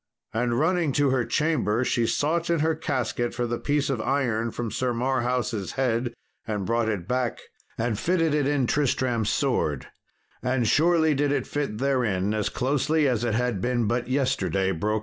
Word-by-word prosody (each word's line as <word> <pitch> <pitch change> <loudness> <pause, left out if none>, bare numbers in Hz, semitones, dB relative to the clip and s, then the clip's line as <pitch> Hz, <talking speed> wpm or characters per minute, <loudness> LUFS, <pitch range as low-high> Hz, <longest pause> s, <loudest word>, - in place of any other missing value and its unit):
And 120 +1 0
running 165 -2 +1
to 145 -1 +2
her 130 -2 +2
chamber 130 -4 +1
she 120 -2 +1
sought 165 +6 0
in 170 -3 +2
her 160 +1 +2
casket 130 -6 -2
for 120 - -1
the 120 0 -2
piece 145 -1 0
of 130 -5 -1
iron 120 -4 0
from 115 -1 -4
Sir 125 -2 -1
Marhaus' 125 -4 -1
head 120 -2 0 0.3
and 105 -3 -2
brought 115 0 +1
it 95 -5 -3
back, 125 -1 -1 0.4
and 115 -2 -1
fitted 165 -3 +1
it 145 -2 +1
in 145 -3 +1
Tristram's 120 -5 +1
sword; 105 - 0 0.5
and 125 -2 0
surely 160 +1 +4
did 145 0 +1
it 145 - 0
fit 145 -7 -3
therein 115 -7 0
as 105 -1 0
closely 145 +3 +1
as 120 -3 0
it 115 -3 0
had 120 -5 0
been 120 0 0
but 120 +3 -1
yesterday 130 -8 0
broke 100 +5 -1
out. - - 0
125 Hz, 180 wpm, -25 LUFS, 115-145 Hz, 0.5 s, surely